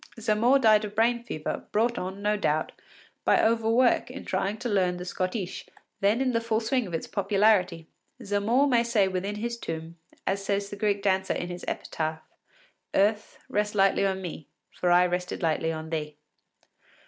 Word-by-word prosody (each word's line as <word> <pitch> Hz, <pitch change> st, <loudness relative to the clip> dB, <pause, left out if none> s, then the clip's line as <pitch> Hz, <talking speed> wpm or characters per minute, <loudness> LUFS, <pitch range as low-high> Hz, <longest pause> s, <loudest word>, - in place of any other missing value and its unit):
Zamore 225 Hz, +5 st, +3 dB
died 220 Hz, -5 st, +5 dB
of 210 Hz, -1 st, -6 dB
brain 235 Hz, +2 st, +2 dB
fever, 155 Hz, -10 st, -5 dB
brought 235 Hz, +3 st, +1 dB
on, 190 Hz, +2 st, -6 dB
no 210 Hz, +1 st, +2 dB
doubt, 155 Hz, -6 st, 0 dB, 0.5 s
by -, -, +4 dB
overwork 230 Hz, +3 st, +3 dB
in 265 Hz, +2 st, -8 dB
trying 195 Hz, +3 st, -1 dB
to 245 Hz, -, -4 dB
learn 185 Hz, -5 st, +1 dB
the 180 Hz, -, -6 dB
schottische, 185 Hz, +1 st, -4 dB, 0.3 s
then 205 Hz, +5 st, +2 dB
in 260 Hz, -1 st, +1 dB
the 230 Hz, -1 st, 0 dB
full 225 Hz, -1 st, 0 dB
swing 235 Hz, 0 st, 0 dB
of 175 Hz, -, -9 dB
its 160 Hz, -, -3 dB
popularity. 195 Hz, -4 st, +2 dB, 0.4 s
Zamore 215 Hz, +7 st, +2 dB
may 245 Hz, -4 st, +4 dB
say 230 Hz, -4 st, +2 dB
within 190 Hz, +2 st, -3 dB
his 235 Hz, +2 st, -4 dB
tomb, 165 Hz, -1 st, -6 dB, 0.3 s
as 195 Hz, +1 st, -1 dB
says 200 Hz, 0 st, -1 dB
the -, -, -5 dB
Greek 205 Hz, -1 st, 0 dB
dancer 190 Hz, -1 st, +1 dB
in 175 Hz, -, -4 dB
her 175 Hz, 0 st, -6 dB
epitaph: 160 Hz, 0 st, -3 dB, 0.7 s
“Earth, 210 Hz, +2 st, +1 dB
rest 210 Hz, 0 st, -1 dB
lightly 195 Hz, 0 st, +3 dB
on 190 Hz, -1 st, -1 dB
me, 160 Hz, -4 st, -7 dB, 0.2 s
for 180 Hz, -, -1 dB
I 175 Hz, +1 st, +6 dB
rested 180 Hz, +1 st, -3 dB
lightly 160 Hz, 0 st, +1 dB
on 160 Hz, 0 st, -6 dB
thee. 150 Hz, -2 st, -4 dB
200 Hz, 175 wpm, -27 LUFS, 180-225 Hz, 0.7 s, I